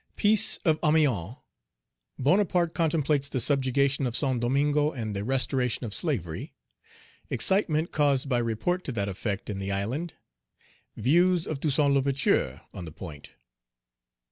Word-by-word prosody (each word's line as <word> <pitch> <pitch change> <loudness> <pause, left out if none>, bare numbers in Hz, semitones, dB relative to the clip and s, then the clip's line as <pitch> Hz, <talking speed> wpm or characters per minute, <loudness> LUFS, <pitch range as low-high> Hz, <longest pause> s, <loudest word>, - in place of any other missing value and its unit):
Peace 215 0 +3
of 155 -2 +3
Amiens 135 - +2 0.8
Bonaparte 175 +3 +2
contemplates 150 -3 0
the 130 - -2
subjugation 140 0 +1
of 120 - +1
Saint 130 -4 +2
Domingo, 145 +4 +1
and 110 -6 -5
the 100 - -3
restoration 125 0 0
of 105 - -5
slavery 100 - -3 0.7
Excitement 170 -5 +1
caused 140 -2 +1
by 125 -3 +1
report 120 +11 -1
to - - -3
that 100 -3 -2
effect 100 +1 -4
in 100 -2 -4
the 100 0 -3
island 120 - -3 0.8
Views 175 - +3
of 155 - -4
Toussaint 145 -1 +2
L'Ouverture 135 - +1
on 90 - -7
the 80 - -9
point. 75 -4 -10
135 Hz, 135 wpm, -27 LUFS, 115-155 Hz, 0.8 s, Peace